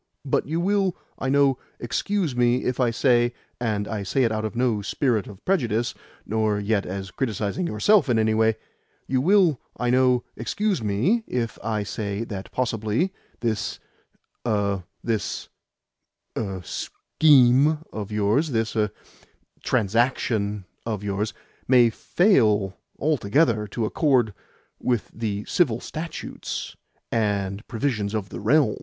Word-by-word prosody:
"But 135 - 0
you 160 +3 -1
will, 195 0 +1 0.2
I 135 - -1
know, 140 -1 +3 0.2
excuse 170 - -1
me 120 +1 +2
if 125 +1 -1
I 125 -2 +3
say 120 0 +2 0.2
(and 105 -4 -1
I 110 -2 -3
say 130 +7 +1
it 115 - +2
out 110 0 -1
of 110 - -4
no 120 -4 +1
spirit 110 0 0
of 100 -3 -12
prejudice, 120 - +1 0.3
nor 110 -1 +1
yet 100 0 0
as 95 0 -5
criticising 115 - -2
yourself 175 - +3
in 120 - +3
any 110 0 +3
way) 110 0 +3 0.5
you 130 -1 +1
will, 175 -4 +4 0.2
I 125 -1 0
know, 125 -1 +4
excuse 210 - -1
me 115 - +1
if 115 -2 -2
I 110 -2 -1
say 100 +2 -3
that 100 -4 -7
possibly 120 - 0 0.3
this 110 -3 -1 0.6
er 100 -5 0 0.2
this, 110 -4 -2 0.9
er, 95 -4 -3
SCHEME 145 - +3
of 105 -1 -5
yours, 105 +9 +2
this 115 -3 -1
er 105 -1 +2 0.7
TRANSACTION 105 -2 +1 0.2
of 110 -3 -3
yours, 105 +1 -1 0.4
may 120 -2 +6
fail 110 - +3 0.2
altogether 120 -5 +2
to 110 +2 -2
accord 125 -3 +2 0.5
with 120 -4 -1
the 105 -2 -3
Civil 120 -10 +2
Statutes 165 +5 -6 0.4
and 100 -2 -1
Provisions 110 -4 -1
of 100 -3 -3
the - - -6
Realm?" 120 +2 +3
115 Hz, 135 wpm, -24 LUFS, 105-135 Hz, 0.9 s, may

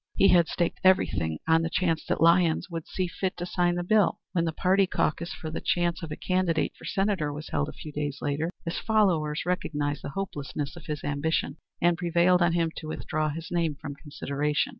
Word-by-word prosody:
He 195 - +5
had 170 -2 +5
staked 170 -2 -1
everything 85 - +3
on 165 0 +5
the 165 - -1
chance 165 -2 0
that - - 0
Lyons 170 +1 +4
would 165 -2 -5
see 185 - -1
fit 185 +2 -3
to 175 - -3
sign 175 -1 +1
the 175 - -1
bill. 210 +2 +3
When 170 -2 +1
the 165 - 0
party 190 +4 +3
caucus 170 0 -1
for 155 - -6
the - - -4
choice 175 -1 0
of 165 -2 -6
a - - -3
candidate 185 -4 0
for - - -13
Senator 195 -6 0
was 150 +1 -7
held 145 +1 -1
a - - -8
few 155 - -9
days 145 -1 -3
later, 145 +3 -1 0.2
his 165 - -2
followers 175 -10 +1
recognized 150 -5 -1
the - - -4
hopelessness 145 -5 -4
of 170 - -12
his 150 -2 -4
ambition 145 0 -1 0.3
and 175 0 +3
prevailed 175 +1 +3
on 175 -1 +3
him 165 -1 +1
to 155 - -6
withdraw 155 0 -2
his 160 +2 -6
name 165 -4 0
from 145 0 -7
consideration. 145 - -2
165 Hz, 210 wpm, -27 LUFS, 150-180 Hz, 0.3 s, He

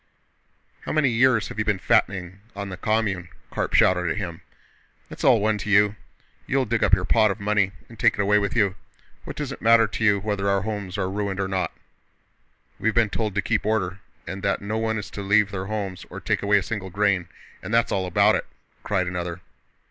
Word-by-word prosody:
"How - - -6
many 155 -3 +3
years 120 -1 +3
have - - -7
you - - +2
been 105 -2 +1
fattening 95 0 0 0.2
on 100 0 -5
the 95 - -5
commune?" 100 -3 -1 0.2
Karp - - -2
shouted 90 -1 +4
at 80 - -2
him. 85 -6 -5 0.7
"It's - - -8
all 125 -4 +5
one 105 0 +1
to 105 - -5
you! 105 0 +4 0.5
You'll 135 -1 +1
dig 115 0 0
up - - +5
your 90 -2 -3
pot 110 +3 +4
of 100 - -3
money 100 -2 +1 0.2
and 115 -1 -15
take 120 - +4
it - - -12
away 105 +1 +3
with 100 +2 -2
you.... 100 -5 +3 0.5
What - - -7
does 145 -3 -4
it - - -8
matter 115 0 +6
to 110 +1 -4
you 100 -2 +4
whether 100 -1 -1
our 100 0 +2
homes 105 -3 -4
are 95 -2 -1
ruined 100 0 -3
or 95 - 0
not?" 95 -1 -1 1.1
"We've 110 - 0
been 115 -3 +3
told 105 -4 -2
to 105 - 0
keep 110 -3 0
order, 100 -3 -1 0.3
and 95 0 -6
that 100 0 0
no 105 +2 -3
one 110 0 -1
is 105 - -6
to 100 - -6
leave 100 +1 +3
their 95 -1 -4
homes 100 -3 -4
or - - -7
take - - -1
away 105 0 +3
a 100 - 0
single 95 0 -4
grain, 100 -2 +1 0.3
and 100 - -7
that's 115 0 +2
all 95 -1 0
about 90 - +4
it!" - - -1 0.3
cried 95 -3 0
another. 90 0 -4
100 Hz, 220 wpm, -24 LUFS, 95-110 Hz, 1.1 s, matter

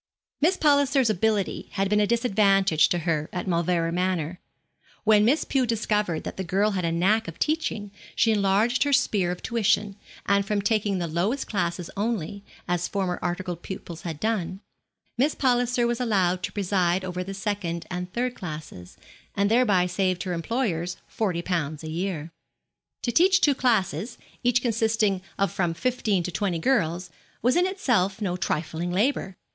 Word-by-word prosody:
Miss 360 +5 +3
Palliser's 285 -5 +3
ability 210 0 0
had 195 -1 0
been 210 +1 +2
a 210 - +3
disadvantage 195 -7 +3
to 175 - +1
her 155 -3 0
at 180 - -4
Mauleverer 170 -1 +1
Manor. 180 -1 -1 0.6
When 215 -1 +5
Miss 280 +7 +3
Pew 260 -3 +1
discovered 210 -7 0
that - - -6
the 190 - -2
girl 200 +4 +1
had 185 -3 -2
a 165 - 0
knack 190 +6 +2
of 165 - -7
teaching 300 -10 -1 0.2
she 225 - +3
enlarged 210 +4 +2
her 285 0 +2
sphere 210 -9 +2
of 180 0 -5
tuition, 210 -3 +1 0.3
and 200 0 +3
from 205 +1 -1
taking 205 -1 +1
the 175 - -1
lowest 180 - -1
class 175 -4 -1 0.2
only, 200 -2 -2 0.2
as 175 0 0
former 190 -3 -2
articled 175 -1 -3
pupils 175 -3 -7
had 160 -4 -5
done, 195 -4 -2 0.6
Miss 290 +4 +2
Palliser 245 -2 +2
was 240 0 0
allowed 185 -6 +1
to - - -3
preside 185 -2 0
over 180 0 -3
the 195 +1 -6
second 190 -4 -3
and 180 0 -4
third 245 +3 -1
classes, 150 - -8 0.4
and 200 +1 +1
thereby 210 -7 +4
saved 185 0 0
her 185 -2 -3
employers 175 -2 -2
forty 180 -6 -2
pounds 160 -4 -2
a 155 - -5
year. 170 -2 -3 0.7
To 240 - 0
teach 360 - +5
two 290 - +4
classes, 220 - 0 0.2
each 245 0 +2
consisting 220 -4 +1 0.2
of 195 -3 +1
from 175 -3 -1
fifteen 220 -4 0
to 180 - -4
twenty 190 -2 -1
girls, 175 -5 0 0.3
was 250 +2 +3
in 355 +1 +3
itself 225 - 0
no 190 -5 -1
trifling 165 0 -2
labour. 195 -1 0
195 Hz, 165 wpm, -25 LUFS, 175-225 Hz, 0.7 s, When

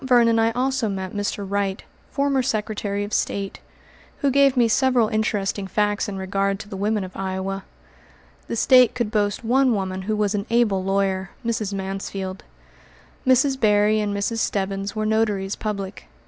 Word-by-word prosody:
Vernon 235 -3 +4
I 225 0 +4
also 260 -2 0
met 190 -2 -4
Mr. 205 -1 -2
Wright, 200 0 -1 0.3
former 275 -1 +1
Secretary 210 -4 -2
of 205 - -6
State, 200 -1 -1 0.6
who 280 -2 +2
gave 275 0 +4
me 240 -2 +5
several 245 -1 +3
interesting 205 -2 -1
facts 205 +2 0
in 195 - -5
regard 195 +1 -1
to 210 - -9
the 205 - -7
women 205 +1 0
of 185 0 -9
Iowa. 190 0 -3 0.8
The - - -3
State 250 +1 +5
could 235 -4 -1
boast 205 0 0
one 250 +1 +3
woman 190 -1 -3
who 215 +3 -1
was 210 -1 0
an 205 +1 -2
able 225 -5 +2
lawyer, 190 -1 0 0.2
Mrs. 220 -3 -1
Mansfield. 195 0 -4 0.8
Mrs. 265 +1 +4
Berry 210 -1 +3
and 210 -1 -1
Mrs. 200 +3 -1
Stebbins 195 -1 -2
were 215 0 -1
notaries 210 -3 0
public. 200 -3 -5
205 Hz, 160 wpm, -23 LUFS, 195-230 Hz, 0.8 s, me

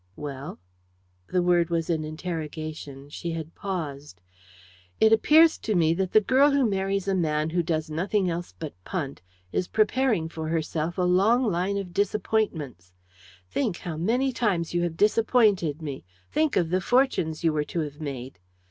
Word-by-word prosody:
"Well?" 140 -1 -6 0.7
The 180 -1 +1
word 175 -1 +3
was 165 -1 -1
an 160 -2 0
interrogation. 155 -3 -6
She 170 +2 -4
had 160 0 -6
paused. 150 - -5 0.8
"It 220 0 +6
appears 315 +8 +5
to 215 - -1
me 165 -2 +3
that 185 +1 -1
the - - +7
girl 265 +7 +4
who 280 -3 +3
marries 195 -1 -1
a 195 - +2
man 155 -3 0
who 175 +1 +1
does 160 -1 -1
nothing 190 +5 0
else 175 0 -3
but 155 -3 -6
'punt' 145 - -4 0.3
is 180 - -1
preparing 220 -5 +1
for 160 -1 -6
herself 160 +1 -2
a 180 - +1
long 195 +8 +4
line 200 -2 0
of 185 -3 -5
disappointments. 185 - -1 0.5
Think 205 - -1
how 170 -4 -5
many 240 +11 +1
times 195 -10 -1
you 175 - +1
have 170 -2 -2
disappointed 210 - +3
me. 140 -3 -5 0.3
Think 310 -1 +1
of 170 -2 +1
the 185 +1 +2
fortunes 245 - +1
you 165 -2 +3
were 150 -1 0
to 165 +3 -2
have 150 0 -6
made. 130 -7 -6
175 Hz, 165 wpm, -26 LUFS, 155-205 Hz, 0.8 s, the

